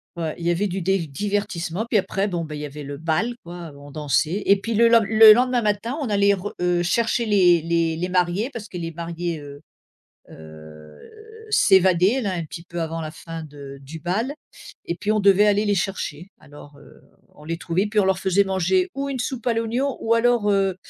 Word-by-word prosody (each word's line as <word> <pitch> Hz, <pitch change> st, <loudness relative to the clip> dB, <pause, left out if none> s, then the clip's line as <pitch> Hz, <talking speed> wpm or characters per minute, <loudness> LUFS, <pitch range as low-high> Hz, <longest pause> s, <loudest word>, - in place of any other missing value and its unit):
Ouais. 160 Hz, -2 st, -3 dB
Il 170 Hz, -, -7 dB
y -, -, +3 dB
avait 200 Hz, +4 st, 0 dB
du 190 Hz, +1 st, -4 dB
des 185 Hz, -2 st, 0 dB
divertissements, 195 Hz, +3 st, -3 dB
puis 230 Hz, -2 st, +1 dB
après 195 Hz, +1 st, -1 dB
bon, 170 Hz, -2 st, -3 dB
ben, 150 Hz, -1 st, -7 dB
il 150 Hz, -, -6 dB
y 150 Hz, -, -4 dB
avait 145 Hz, +1 st, -8 dB
le 140 Hz, 0 st, -7 dB
bal 165 Hz, +10 st, -1 dB
quoi, 170 Hz, -2 st, -9 dB
heu, 140 Hz, -, -15 dB
on 145 Hz, 0 st, -13 dB
dansait, 155 Hz, -, -1 dB
et 200 Hz, -, +6 dB
puis 225 Hz, +4 st, -4 dB
le 230 Hz, +2 st, +5 dB
len 230 Hz, -1 st, +5 dB
le 220 Hz, +1 st, +8 dB
lendemain 250 Hz, +1 st, +1 dB
matin, 215 Hz, +6 st, -1 dB
on 265 Hz, -, -2 dB
allait 200 Hz, 0 st, +3 dB
re 200 Hz, +2 st, -5 dB
heu, 175 Hz, -1 st, +1 dB
chercher 230 Hz, +5 st, 0 dB
les 180 Hz, -5 st, +4 dB
les 165 Hz, 0 st, 0 dB
les 180 Hz, +2 st, -3 dB
mariés 180 Hz, +6 st, 0 dB
parce 235 Hz, -5 st, -9 dB
que 180 Hz, -, -7 dB
les 165 Hz, -1 st, -4 dB
mariés, 170 Hz, 0 st, -4 dB
heu 145 Hz, 0 st, -11 dB, 0.7 s
heu 80 Hz, -1 st, -13 dB, 0.5 s
s'évadaient 190 Hz, -, +4 dB
là 200 Hz, -4 st, -2 dB
un 170 Hz, -2 st, -3 dB
petit 165 Hz, +2 st, -9 dB
peu 170 Hz, -1 st, -6 dB
avant 165 Hz, 0 st, -3 dB
la 155 Hz, -, -6 dB
fin 165 Hz, 0 st, -8 dB
de 140 Hz, -2 st, -11 dB
du 155 Hz, +4 st, -9 dB
bal, 220 Hz, -, -2 dB, 0.5 s
et 170 Hz, -, -4 dB
puis 210 Hz, +4 st, -1 dB
on 215 Hz, -, +1 dB
devait 200 Hz, +1 st, +5 dB
aller 205 Hz, +1 st, +2 dB
les 205 Hz, -1 st, +1 dB
chercher. 180 Hz, -3 st, -3 dB
Alors, 145 Hz, 0 st, -15 dB
heu, 145 Hz, -, -18 dB, 0.3 s
on 150 Hz, -, -15 dB
les 165 Hz, +1 st, -3 dB
trouvait 175 Hz, +5 st, -1 dB
puis 210 Hz, 0 st, +2 dB
on -, -, 0 dB
leur 190 Hz, -1 st, +1 dB
faisait 190 Hz, +1 st, +2 dB
manger 195 Hz, -, 0 dB
ou 275 Hz, 0 st, -3 dB
une 260 Hz, -2 st, -4 dB
soupe 250 Hz, -1 st, -4 dB
à 235 Hz, -, +3 dB
l'oignon 235 Hz, +4 st, -1 dB
ou 225 Hz, +1 st, +1 dB
alors, 230 Hz, -3 st, +2 dB
heu, 195 Hz, -2 st, +1 dB
185 Hz, 225 wpm, -22 LUFS, 165-210 Hz, 0.7 s, le